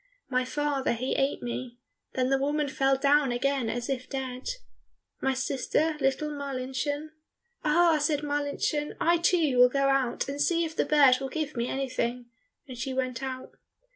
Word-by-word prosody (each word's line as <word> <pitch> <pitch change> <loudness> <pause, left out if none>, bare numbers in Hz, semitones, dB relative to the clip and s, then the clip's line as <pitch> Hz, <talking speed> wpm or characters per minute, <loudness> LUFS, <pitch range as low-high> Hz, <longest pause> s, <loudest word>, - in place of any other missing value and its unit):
"My 255 0 +1
father 285 -1 0
he 250 +3 -2
ate 275 +1 0
me," 245 0 -5 0.4
Then 255 0 0
the 270 - +3
woman 290 +2 0
fell 270 0 +2
down 280 -1 +3
again 260 -1 0
as 240 0 -3
if 255 -2 -3
dead. 260 -2 -4 0.7
"My 270 0 +1
sister, 280 +4 0
little 275 +2 0
Marlinchen," 280 +1 -3 0.5
"Ah," 325 0 +4
said 295 0 0
Marlinchen, 290 +1 -1
"I 340 0 +3
too 325 -7 +2
will 250 0 +8
go 275 +1 +1
out 265 -3 +1
and 280 +1 -3
see 335 +2 +2
if 320 0 -6
the - - +1
bird 280 -4 +5
will 270 0 -4
give 310 +1 -3
me 235 0 -1
anything," 250 -3 -2 0.4
and 255 - -8
she 260 +1 -3
went 255 -1 -2
out. 260 -1 -5
270 Hz, 170 wpm, -28 LUFS, 255-295 Hz, 0.7 s, will